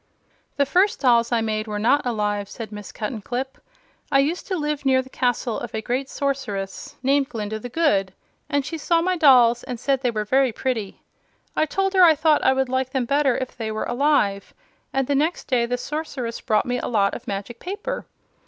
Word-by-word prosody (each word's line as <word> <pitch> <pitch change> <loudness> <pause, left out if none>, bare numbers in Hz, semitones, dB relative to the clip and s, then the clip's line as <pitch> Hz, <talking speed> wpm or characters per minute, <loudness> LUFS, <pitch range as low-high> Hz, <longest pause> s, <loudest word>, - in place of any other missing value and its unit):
"The 285 - +3
first 375 +8 +2
dolls 235 -3 +3
I 235 -1 +2
made 215 0 -2
were 210 -1 -3
not 240 +7 +3
alive," 210 -3 -1
said 220 -3 -7
Miss 210 -1 -8
Cuttenclip. 245 +4 -4 0.5
"I 275 - +5
used 295 +6 0
to 375 - -1
live 300 -2 -2
near 265 -1 +4
the 260 - -16
castle 245 -2 -1
of 240 -2 -6
a 220 - -2
great 260 +4 -2
Sorceress 210 -9 -3
named 275 +1 +2
Glinda 220 -2 -4
the 245 - -7
Good, 210 - +1 0.4
and 285 -2 0
she 325 +2 -5
saw 335 +2 +2
my 370 +1 +1
dolls 250 -7 +6
and 245 -2 -6
said 270 +1 0
they 250 - +1
were 215 -2 -2
very 260 +3 +3
pretty. 225 -4 -3 0.5
I 310 - +2
told 390 +4 0
her 375 - +5
I 330 -3 +8
thought 310 0 +3
I - - +5
would 265 0 0
like 260 0 -1
them 260 -2 -1
better 275 -1 +2
if 255 - -5
they 220 -2 -4
were 215 - -2
alive, 240 -7 +1 0.4
and 270 0 0
the 285 - 0
next 310 +5 0
day 240 -3 +1
the 245 +1 -1
Sorceress 265 -4 -4
brought 215 -1 +1
me 245 0 -1
a - - -4
lot 200 -4 +2
of 250 - -8
magic 200 +4 -5
paper. 410 +7 -5
255 Hz, 210 wpm, -23 LUFS, 225-285 Hz, 0.5 s, I